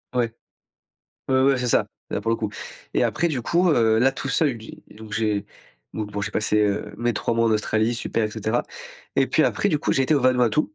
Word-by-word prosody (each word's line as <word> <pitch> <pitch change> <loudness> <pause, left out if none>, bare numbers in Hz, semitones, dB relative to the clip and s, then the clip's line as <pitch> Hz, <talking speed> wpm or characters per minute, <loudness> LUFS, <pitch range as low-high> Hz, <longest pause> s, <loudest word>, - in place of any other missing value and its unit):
Ouais. 115 -2 0 1.0
Ouais, 130 0 +3
ouais, 135 -1 +3
c'est 125 - -2
ça, - - +3 0.2
là - - -2
pour 115 - -1
le 115 - +2
coup 110 -2 -3 0.4
et - - +1
après 170 +3 +1
du 135 -6 -2
coup, 175 +8 +2
heu, 110 -5 +3
là 135 +3 +3
tout 135 - -5
seul 135 -6 +1
j'ai, 110 - -12
donc 110 0 -12
j'ai, 105 -2 0 0.5
donc 105 -1 -4
bon 105 0 -4
j'ai 100 - -3
passé, 105 0 +1
heu, 105 -1 0
mes 120 0 0
3 - - -1
mois 115 0 +2
en - - +2
Australie 110 +2 +1
super 115 -1 -1
et 105 - -2
cetera 110 +2 -1 0.5
et - - +4
puis - - +2
après 205 - +1
du 150 - +1
coup - - 0
j'ai 135 - +2
été 150 +4 +2
au 140 - +2
Vanuatu 125 +2 +3
115 Hz, 235 wpm, -23 LUFS, 110-130 Hz, 1.0 s, et